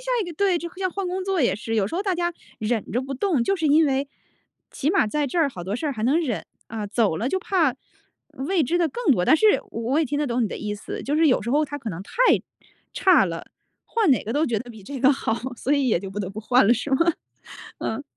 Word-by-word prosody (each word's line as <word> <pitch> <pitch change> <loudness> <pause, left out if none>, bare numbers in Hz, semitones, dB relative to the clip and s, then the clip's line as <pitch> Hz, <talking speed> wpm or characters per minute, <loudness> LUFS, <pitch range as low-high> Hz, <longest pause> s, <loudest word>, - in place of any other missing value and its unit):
下 - - -4
一 - - -4
个 - - -6
对， 385 -2 +2
就 340 +1 -6
像 370 -1 -1
换 390 0 -3
工 370 +1 -2
作 385 -3 0
也 235 -7 +2
是， 225 +2 -4
有 210 -3 +2
时 210 - -6
候 370 - 0
大 390 -3 0
家 345 0 -1 0.3
忍 220 0 -2
着 240 - +1
不 270 +1 -6
动， 290 -4 +1
就 390 - +2
是 325 -5 -1
因 305 +2 +5
为 275 0 0 0.6
起 290 +4 -1
码 390 - +3
在 295 +6 -1
这 280 - -2
儿 320 -3 +4
好 180 -8 -8
多 195 +4 -3
事 310 - -3
儿 290 - 0
还 220 -4 -5
能 270 +8 +3
忍。 255 -10 -2 0.2
啊， 220 -2 -4
走 205 -4 +1
了 235 +8 -1
就 375 - 0
怕 355 -7 +1 0.8
未 380 -2 +2
知 335 +8 0
的 345 -2 +2
更 435 - +1
多。 180 - 0
但 315 - +5
是 435 - +3 0.2
我 240 +7 0
也 - - +2
听 290 +1 -2
得 295 - 0
懂 245 -1 0
你 220 - 0
的 - - -5
意 210 -1 -3
思， 205 - -7
就 285 - -1
是 315 0 +4
有 255 - +3
时 215 - -6
候 295 +5 +3
它 290 0 -6
可 245 - -6
能 175 +1 -6
太 - - -16 0.8
差 370 - +5
了， 165 -3 -5 0.4
换 440 -8 +1
哪 255 - +3
个 225 - -3
都 295 +4 +2
觉 235 -7 0
得 245 +3 -9
比 220 -3 -11
这 270 +8 -7
个 265 +3 +5
好， 265 - -2 0.2
所 270 - -1
以 280 -2 +2
也 215 -8 +2
就 195 0 -7
不 200 - -5
得 190 - -3
不 200 +3 -7
换 245 0 +4
了 235 - +5
是 250 +4 -4
吗？ 265 - +4 0.8
嗯。 225 +6 -3
275 Hz, 295 characters per minute, -24 LUFS, 225-330 Hz, 0.8 s, 因